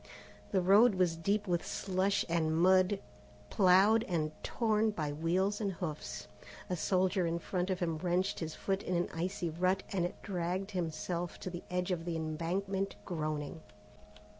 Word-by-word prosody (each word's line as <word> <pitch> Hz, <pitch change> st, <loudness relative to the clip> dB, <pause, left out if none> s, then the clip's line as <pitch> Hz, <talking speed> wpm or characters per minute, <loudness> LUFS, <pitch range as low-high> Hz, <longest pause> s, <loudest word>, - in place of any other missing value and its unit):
The 190 Hz, -, +3 dB
road 200 Hz, +4 st, +6 dB
was 180 Hz, -3 st, +2 dB
deep 200 Hz, +6 st, 0 dB
with 175 Hz, -2 st, +1 dB
slush 190 Hz, +1 st, 0 dB
and 160 Hz, -2 st, +1 dB
mud 185 Hz, +3 st, +4 dB, 0.5 s
ploughed 200 Hz, +3 st, +5 dB
and 155 Hz, -4 st, 0 dB
torn 220 Hz, -2 st, +1 dB
by 155 Hz, -8 st, -2 dB
wheels 180 Hz, +7 st, 0 dB
and 200 Hz, -2 st, -1 dB
hoofs. 160 Hz, -4 st, -5 dB, 0.4 s
A -, -, +1 dB
soldier 185 Hz, +1 st, +1 dB
in 165 Hz, +1 st, 0 dB
front 180 Hz, +1 st, -2 dB
of 185 Hz, -1 st, -1 dB
him 165 Hz, -2 st, -1 dB
wrenched 180 Hz, +3 st, 0 dB
his 160 Hz, -2 st, -4 dB
foot 195 Hz, 0 st, -1 dB
in 180 Hz, -, -2 dB
an 175 Hz, -, 0 dB
icy 175 Hz, 0 st, -2 dB
rut 185 Hz, +4 st, +1 dB
and 180 Hz, -2 st, 0 dB
dragged 185 Hz, +1 st, -2 dB
himself 170 Hz, -1 st, -3 dB
to 185 Hz, -, -4 dB
the 175 Hz, -, -6 dB
edge 180 Hz, +1 st, -1 dB
of 165 Hz, -2 st, -2 dB
the 170 Hz, -1 st, -2 dB
embankment 180 Hz, +5 st, -2 dB
groaning. 155 Hz, -2 st, -3 dB
180 Hz, 160 wpm, -33 LUFS, 165-195 Hz, 0.5 s, road